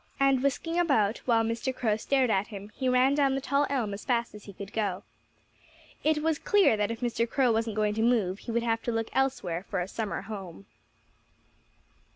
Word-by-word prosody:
And 275 -2 +3
whisking 330 +5 0
about, 225 -11 +2
while 230 -2 +3
Mr. 230 +3 -2
Crow 220 -5 +1
stared 255 +2 +1
at 195 0 +1
him, 205 -1 -9
he 260 -1 -1
ran 255 +2 +4
down 280 -2 +2
the - - 0
tall 280 +1 +1
elm 235 -7 -1
as 200 - -7
fast 235 -2 0
as 210 -1 -12
he 200 - -10
could 200 +2 -9
go. 200 -4 -1 1.0
It 305 0 +2
was 320 -1 +1
clear 410 - +4
that 210 -1 0
if 230 -1 -5
Mr. 235 -1 0
Crow 260 -2 +2
wasn't 225 -1 -1
going 210 -1 +1
to 220 - -2
move 220 -5 +2
he 235 - -6
would 235 +1 0
have 225 -1 0
to 240 - -2
look 225 -1 -2
elsewhere 195 -11 0
for - - -1
a 180 - -2
summer 215 +1 -3
home. 190 - -8
230 Hz, 205 wpm, -28 LUFS, 210-270 Hz, 1.0 s, ran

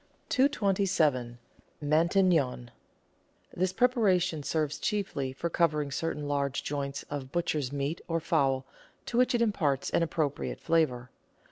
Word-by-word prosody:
227— 185 - +2 0.4
MATIQNON 155 -5 +2 0.9
This 185 +1 +1
preparation 190 - +2
serves 150 0 -1
chiefly 155 -11 -2
for 135 +6 -3
covering 150 -4 +1
certain 150 0 -3
large 140 -1 -1
joints 140 -1 -3
of 135 -2 -5
butcher's 155 -6 -1
meat, 140 +3 -2
or 165 -1 0
fowl, 135 -6 +1 0.4
to - - -5
which 255 0 +3
it 235 - +3
imparts 155 - 0
an - - +2
appro 155 -3 0
priate - - -5
flavour. 130 -7 0
155 Hz, 125 wpm, -29 LUFS, 140-185 Hz, 0.9 s, which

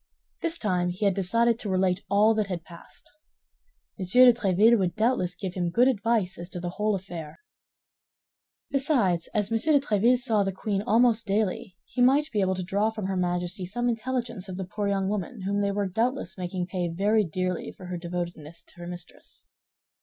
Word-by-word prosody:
This 335 0 -1
time 180 - 0
he 185 +4 -2
had 200 - +4
decided 230 +5 +2
to 210 - -5
relate 185 0 +1
all 210 +3 +4
that 215 -2 0
had 180 -4 -4
passed. 170 -1 -12 0.9
M. 190 - -2
de 250 +1 +8
Tréville 220 +1 +4
would 180 -2 0
doubtless 215 -6 +1
give 185 -2 -5
him 175 -2 -1
good 240 +9 +4
advice 220 -6 0
as 175 +1 -6
to 180 - -6
the 175 0 -4
whole 210 +2 0
affair. 175 -5 -7 1.3
Besides, 250 - +1
as 210 0 0
M. 225 - +2
de 300 +3 +4
Tréville 235 -1 +3
saw 230 -4 +1
the 195 -1 0
queen 195 +1 -2
almost 225 +1 +3
daily, 205 0 -1
he 250 - -3
might 280 +5 +4
be 210 - 0
able 190 0 +1
to 185 - -3
draw 200 +4 +1
from 220 -3 -5
her 190 0 -2
Majesty 180 +1 -2
some 240 +6 -2
intelligence 235 -4 -3
of 180 - -6
the 190 - -4
poor 205 +2 -3
young 195 -1 0
woman, 205 +1 -4
whom 200 +1 0
they 200 0 +1
were 200 0 -1
doubtless 235 +8 -1
making 180 -1 -3
pay 180 -1 -3
very 205 +6 +2
dearly 185 +1 -3
for 185 - -13
her 180 0 -4
devotedness 170 -2 -6
to - - -15
her 175 - -7
mistress. 175 -1 -10
200 Hz, 195 wpm, -26 LUFS, 180-225 Hz, 1.3 s, de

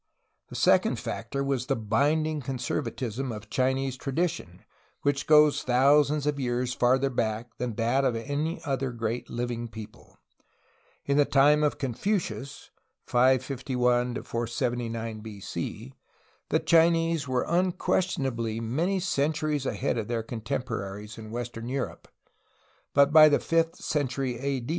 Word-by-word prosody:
The - - -9
second - - +3
factor 140 +4 -4
was 135 -2 -1
the 135 - +1
binding 145 +8 +1
conservatism 130 -1 -3
of 105 -1 -9
Chinese 130 0 0
tradition, 135 - -3 0.4
which 145 0 0
goes 150 -1 +6
thousands 140 +3 +3
of 145 -1 0
years 125 -1 -1
farther 130 +3 +2
back 115 0 -2
than 125 -3 -3
that 120 +5 +1
of 130 -3 +1
any 145 +8 -2
other 135 -2 -1
great 115 0 -3
Uving 120 -1 -4
peo 110 -1 -6
ple. - - -22 0.9
In 140 0 +1
the 145 - +5
time 145 +2 +4
of 150 -1 +1
Confucius 140 - -3 0.3
(551 125 -1 +1
479 115 -2 -3
B. 105 -2 -9
C.) 105 +7 -6 0.6
the - - +3
Chinese 165 -2 +3
were 130 -1 0
unquestionably 135 -10 0
many 160 +13 0
centuries 150 -4 0
ahead 130 -3 -1
of 105 - -4
their 115 -1 -2
contem 115 +2 -4
poraries 105 0 -6
in 110 -1 -9
western 120 0 -5
Europe, 135 0 -4 0.9
but 140 +1 +5
by 155 -1 +9
the 145 - +4
fifth 165 0 +1
century 130 -4 -2
A. 135 -2 -2
130 Hz, 135 wpm, -27 LUFS, 115-145 Hz, 0.9 s, by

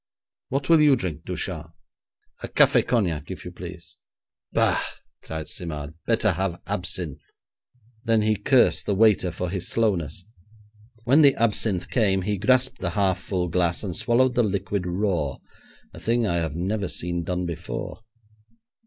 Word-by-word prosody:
What 135 +1 -2
will 165 -2 +6
you 145 -2 +6
drink, 90 - -5
Ducharme?', - - -4 0.7
'A - - -4
café - - +4
cognac, 85 -11 0
if - - -7
you - - -6
please.' - - -10 0.5
'Bah!' - - +2 0.4
cried 80 -1 -6
Simard; 75 -4 -5
'better 110 -2 +3
have 90 -1 -2
absinthe.' 90 -6 -2 0.8
Then 115 -2 +2
he 110 0 +2
cursed 120 +5 +3
the 100 - +1
waiter 105 -3 +4
for 90 +1 -4
his 95 -2 -3
slowness. 90 -7 0 0.8
When 135 +7 +5
the 140 -2 +6
absinthe 110 -4 +1
came 95 -6 +2
he 105 0 -1
grasped 130 +3 +2
the 90 - -1
half 95 -2 +2
full 90 -2 -2
glass 85 +1 0
and 95 -5 -4
swallowed 120 +3 +2
the 120 - +3
liquid 100 -3 -1
raw, 90 -6 -1 0.6
a - - -10
thing 115 0 +1
I 85 -4 0
had 80 -3 -2
never 95 +3 -1
seen 85 0 -3
done 90 +1 -2
before. 85 -2 -5
95 Hz, 155 wpm, -24 LUFS, 85-115 Hz, 0.8 s, will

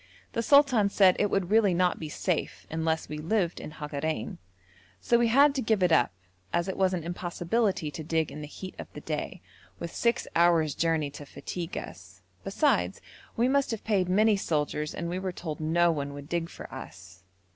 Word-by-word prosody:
The 230 - 0
sultan 255 -5 +5
said 190 -2 +5
it 205 - +2
would 195 -1 -1
really 210 -5 +4
not 180 0 +2
be 155 - -5
safe 170 +2 -2
unless 160 0 -1
we 150 - -5
lived 175 +2 0
in - - -7
Hagarein, 150 -4 -4 0.6
so 235 - +2
we 240 - +3
had 275 +5 +5
to 270 - -1
give 215 -4 +1
it 180 - +3
up 140 -7 +4 0.4
as 170 +2 0
it 190 - -3
was 190 -1 +2
an 170 - -4
impossibility 175 +1 -1
to 155 +2 -6
dig 160 0 0
in 150 - -7
the 150 - -6
heat 185 +5 -8
of - - -8
the - - -8
day, - - -4 0.3
with 170 - -6
six 235 0 0
hours' 165 -3 +4
journey 160 -3 0
to 145 - -9
fatigue 175 +3 -6
us; 95 +2 -9 0.2
besides 90 +1 +1 0.4
we 235 +2 +3
must 275 +1 +2
have 225 -3 -4
paid 195 -5 +1
many 210 +3 +4
soldiers 150 -4 -1
and 170 - -3
we 180 +2 -2
were 190 -1 -3
told 160 -4 -6
no 170 +2 +3
one 140 -2 -3
would 145 0 -9
dig 170 0 -2
for - - -10
us. 90 0 -10
170 Hz, 200 wpm, -28 LUFS, 155-200 Hz, 0.6 s, sultan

